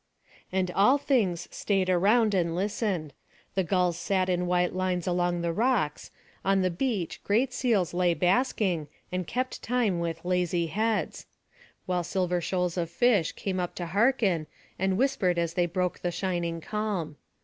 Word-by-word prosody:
And 185 -1 0
all 205 +10 +4
things 205 - 0
stayed 195 -3 0
around 205 +5 +3
and 170 -3 +1
listened; 190 - -2 0.4
the 190 - +1
gulls 180 -1 +1
sat 185 0 0
in 180 0 0
white 180 0 +1
lines 185 -1 -1
along 175 -1 0
the 170 -1 -1
rocks; 215 - 0 0.3
on 195 0 +2
the 185 - +1
beach 195 -2 -2
great 240 +5 +1
seals 225 -10 +1
lay 175 -1 +2
basking, 185 - +1 0.2
and 180 -2 -2
kept 255 +1 -3
time 230 -8 0
with 165 0 -4
lazy 180 -1 +1
heads; 215 +6 -1 0.6
while 180 -1 0
silver 180 0 -1
shoals 180 0 -1
of 170 -2 -1
fish 200 -2 +2
came 190 -2 -3
up 175 -1 -3
to 175 - -4
hearken, 200 - +2 0.3
and 190 0 +1
whispered 235 -9 +1
as 170 -1 0
they 175 0 +1
broke 180 +1 -1
the 175 - -1
shining 175 -2 -2
calm. 195 -7 -3
180 Hz, 160 wpm, -28 LUFS, 175-205 Hz, 0.6 s, all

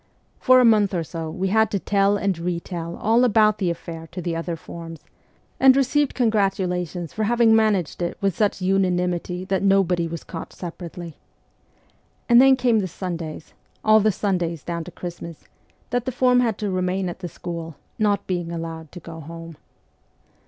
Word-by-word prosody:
For 255 -1 +6
a 250 - +5
month 210 -4 +4
or 170 - 0
so 160 0 -6
we 190 +3 -2
had 220 +1 +3
to 205 - -1
tell 200 +1 +2
and 200 -2 0
retell 170 0 -4
all 230 +3 +2
about 215 -3 +4
the 185 -4 +1
affair 165 -1 -6
to 180 - -6
the 170 -1 -3
other 165 +1 -3
forms, 165 0 -9 0.6
and 265 -1 +7
received 275 +1 +1
con 240 -3 +2
gratulations 180 -5 -1
for 215 - -1
having 230 0 +4
managed 210 -7 +1
it 175 - -2
with 195 -3 0
such 205 -2 0
unanimity 180 -1 0
that 190 -1 0
nobody 190 -3 +2
was 165 0 -6
caught 165 - -8
separately. 175 -1 -8 1.1
And 240 0 +7
then 270 0 +7
came 245 -3 +2
the 190 - -1
Sundays 170 -3 -6 0.3
all 215 0 +6
the 215 +1 +3
Sundays 175 -6 -2
down 170 -1 -4
to - - -9
Christmas 170 -2 -8 0.4
that 245 -1 0
the 260 - -1
form 250 0 +3
had 230 -4 +1
to 205 -2 -2
remain 185 +1 -1
at 175 - -6
the 180 - -5
school, 165 -3 -7 0.2
not 205 -2 +1
being 175 -2 -3
allowed 165 -2 -6
to 180 - -8
go 165 -1 -10
home. 165 +1 -9
185 Hz, 180 wpm, -23 LUFS, 170-215 Hz, 1.1 s, and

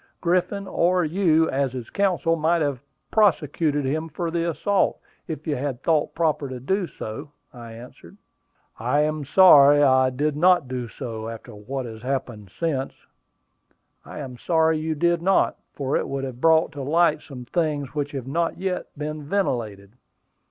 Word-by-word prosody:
Griffin, 185 +3 0
or 180 0 +2
you, 160 -1 +2
as 135 -1 -1
his 125 -3 -7
counsel, 180 -4 +1
might 165 +1 +1
have 140 -4 -2 0.3
prosecuted 155 -7 +2
him 155 +4 -2
for 165 +2 -4
the 170 0 -1
assault, 195 +6 0 0.3
if 155 -3 -6
you 150 - -1
had 135 -1 -4
thought 155 -3 +1
proper 155 -4 0
to 130 -1 -6
do 185 +8 -1
so," 140 +5 -8 0.2
I 120 -2 -10
answered. 120 +2 -13 0.6
"I 125 +6 +1
am 155 0 -1
sorry 145 -3 +7
I 130 -1 +4
did 145 +3 -1
not 175 -2 +4
do 125 -1 -4
so, 115 -1 -6
after 115 -1 -9
what 125 +6 -5
has 110 -2 -9
happened 125 -6 -4
since." 145 -6 -1 1.1
"I - - -10
am 130 -4 -7
sorry 160 -2 +2
you 160 0 -2
did 170 +2 +1
not, 190 +2 +2 0.2
for 140 -1 -2
it - - 0
would 135 0 -3
have 130 -2 -6
brought 160 0 +4
to 145 -3 -7
light 155 +2 +2
some 125 -4 -10
things 145 -2 -2
which 145 -1 -3
have 135 -3 -5
not 165 +5 -1
yet 185 -1 -3
been 150 +1 -4
ventilated." 110 - -2
150 Hz, 165 wpm, -23 LUFS, 130-165 Hz, 1.1 s, sorry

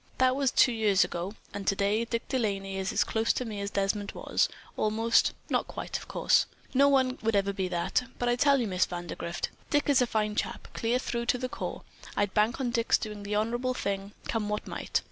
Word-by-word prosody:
That 255 0 +4
was 275 -1 +2
two 245 - +5
years 210 -4 +3
ago, 180 +5 -4 0.2
and 200 -1 -6
today 200 +3 +2
Dick 230 0 -3
De 260 - 0
Laney 195 -3 -2
is 190 0 -1
as - - +3
close 225 0 +1
to 250 - -2
me 210 -3 -5
as 200 - -2
Desmond 200 0 -1
was, - - +1 0.3
almost, 225 +2 +2
not - - 0
quite, - - -6
of - - -12
course. - - +3 0.3
No 280 +2 +5
one 260 -2 +2
will 225 -1 +1
ever 200 0 +1
be 190 -1 -1
that. 180 +7 0
But, 245 - -1
I 240 - +3
tell 280 +2 +4
you, 240 - 0
Miss 185 -3 +1
Vandergrift, 175 -1 -4 0.2
Dick 290 -1 +2
is 280 -2 +5
a 250 - +3
fine 215 -2 0
chap, - - -3
clear 235 +2 +1
through 235 -2 -3
to 250 - +3
the 255 +1 -3
core. - - -5 0.3
I'd 205 -1 +1
bank 215 +4 +2
on 250 -3 0
Dick's 235 -1 +3
doing 210 -2 -6
the 205 +1 -3
honorable 240 +4 0
thing, 200 -2 -3
come 215 -2 -1
what 210 0 -2
might. - - -1
220 Hz, 220 wpm, -29 LUFS, 200-245 Hz, 0.3 s, two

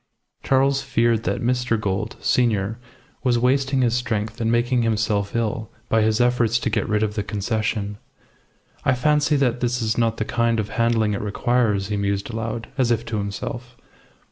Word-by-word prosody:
Charles 135 +1 +2
feared 115 -3 +1
that - - -1
Mr. 125 -2 +1
Gould, 100 0 -2
senior, 110 -3 +1 0.4
was 125 -3 +3
wasting 135 +2 +2
his 120 -2 +2
strength 110 -2 -2
and 115 0 +1
making 120 +1 +2
himself 105 -2 0
ill 110 -1 -1 0.2
by 110 - +3
his 110 +1 +2
efforts 120 -2 +3
to 120 -1 -2
get - - -1
rid 105 0 +2
of 105 -1 -1
the 105 - -1
Concession. 105 0 -2 0.8
"I 130 - +3
fancy 150 +3 +2
that 130 -3 +1
this 125 0 0
is 110 0 0
not 115 -1 +1
the 110 - -1
kind 115 0 +1
of 105 - -2
handling 115 -2 +1
it 100 - -2
requires," 105 -1 0
he 105 - -1
mused 100 +2 -1
aloud, 115 0 -4
as 125 -2 +3
if 115 0 +1
to 110 - -3
himself. 120 +5 -5
115 Hz, 175 wpm, -22 LUFS, 105-125 Hz, 0.8 s, was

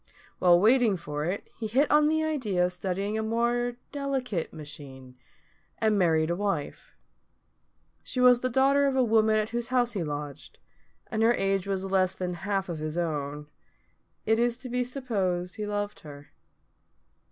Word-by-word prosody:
While 175 -1 +6
waiting 225 -1 +4
for 150 -2 -4
it, 185 +4 -3
he 220 - -2
hit 265 +7 +2
on 300 0 +5
the 315 +1 +1
idea 230 -13 0
of 180 - -3
studying 195 +4 -2
a - - 0
more 235 +2 0 0.2
delicate 265 - -2
machine, 140 -4 -11 0.6
and 220 -1 +2
married 165 -4 +2
a - - 0
wife. 200 - -3 1.1
She 255 - -5
was 250 -1 +6
the 255 - -1
daughter 275 +3 +3
of 270 - 0
a 260 - +4
woman 220 -1 +3
at 215 0 -1
whose 235 0 -2
house 250 -1 +1
he 195 -5 -2
lodged, 145 -1 -6 0.5
and 220 -1 -1
her 235 +2 +4
age 195 0 0
was 195 -1 -2
less 190 -1 +1
than 180 -1 -3
half 195 +2 -2
of 170 -3 -5
his 155 +1 -4
own. 150 -3 -3 0.8
It 220 +1 +2
is 240 0 +1
to 255 0 -9
be 250 +1 0
supposed 200 -8 -2
he 210 -1 -3
loved 205 0 -3
her. 145 -1 -12
205 Hz, 170 wpm, -27 LUFS, 175-245 Hz, 1.1 s, While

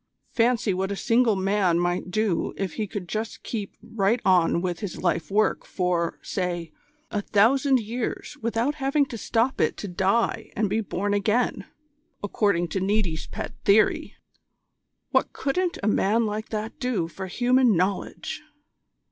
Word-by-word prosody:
Fancy 230 -3 +2
what 190 +2 -1
a - - -1
single 230 +1 +3
man 190 -2 +2
might 175 +1 -1
do 210 -2 0
if 195 -4 -2
he 215 - -2
could 195 -3 -6
just 220 +4 -4
keep 210 -4 -5
right 225 +2 +1
on 180 -3 +4
with 175 -1 -2
his 200 -4 -6
life 165 -3 0
work 215 +2 +2
for, 180 -2 -1
say, 175 -3 -3 0.4
a 205 - -1
thousand 260 +7 +3
years 235 +6 -4
without 230 +5 0
having 275 +2 +2
to 255 - -8
stop 230 +3 0
it - - +1
to 205 - -5
die 195 +5 0
and 210 -3 0
be 220 +2 +1
born 205 0 -2
again, 210 0 +1 0.6
according 200 -4 +1
to 190 - -1
Niti's 190 -5 0
pet - - -6
theory. 215 +2 +3 1.0
What - - +2
couldn't 350 +5 -1
a - - +1
man 215 +2 +2
like 215 +1 -3
that 215 0 -4
do 225 -10 0
for 190 +3 -7
human 245 +1 +3
knowledge!" 190 - -2
205 Hz, 155 wpm, -25 LUFS, 185-230 Hz, 1.0 s, on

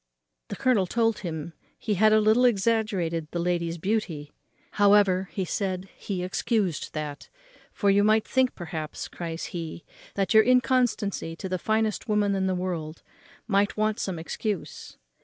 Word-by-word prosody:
The - - -5
colonel 225 -8 +2
told 225 +1 +1
him 165 -3 -5 0.2
he 215 - -2
had 215 +3 +4
a 215 - +6
little 220 +3 +4
exaggerated 200 -8 +1
the 175 - -4
lady's 170 -1 -1
beauty; 170 -6 -2 0.4
however, 200 -2 +4
he 190 - -2
said, 190 0 -3
he 185 -3 -4
excused 190 - -1
that, 145 -2 -5 0.4
"for 200 -1 +2
you 200 +1 +4
might 215 +1 +3
think, 260 -1 +2
perhaps," 160 -3 -5
cries 165 -1 -6
he, 165 -1 -6 0.3
"that 195 +1 0
your 220 - +8
inconstancy 245 -7 +1
to 190 - -6
the 185 -1 -2
finest 220 +2 -1
woman 210 -1 +2
in 190 -1 0
the 185 - 0
world 170 -3 -4 0.4
might 200 0 +1
want 215 +1 0
some 190 -3 -3
excuse. 190 +4 -5
195 Hz, 155 wpm, -26 LUFS, 170-215 Hz, 0.4 s, your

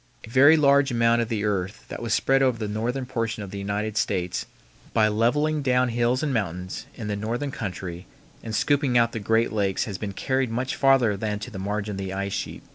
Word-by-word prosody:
A - - -13
very 145 +6 +7
large 140 -2 +4
amount 115 -1 +3
of 115 - -2
the 110 -3 -1
earth 100 0 -2
that - - -6
was 115 -1 -3
spread 135 +4 +3
over 130 -3 +2
the 110 -2 -3
northern 120 +5 -2
portion 115 -4 -3
of 95 - -8
the 100 - -5
United 105 +2 -2
States 90 -4 -1 0.5
by 110 -2 +4
leveling 145 +8 +1
down 125 -2 +2
hills 120 +3 +1
and 145 -3 0
mountains 90 -5 -3
in 115 - -6
the 105 - -1
northern 120 +7 -3
country 90 -7 -6 0.3
and 110 -1 -5
scooping 140 -2 +2
out 115 0 +3
the 115 - -4
great 115 +2 +1
lakes 100 -3 0
has 100 -6 -5
been 100 -2 -4
carried 130 +4 0
much 125 +3 -2
farther 135 -6 +4
than 105 +1 -2
to 115 +4 -7
the 95 - -7
margin 105 +2 -2
of 100 - -5
the 95 -1 -4
ice 100 0 -3
sheet. - - -4
115 Hz, 220 wpm, -25 LUFS, 100-125 Hz, 0.5 s, very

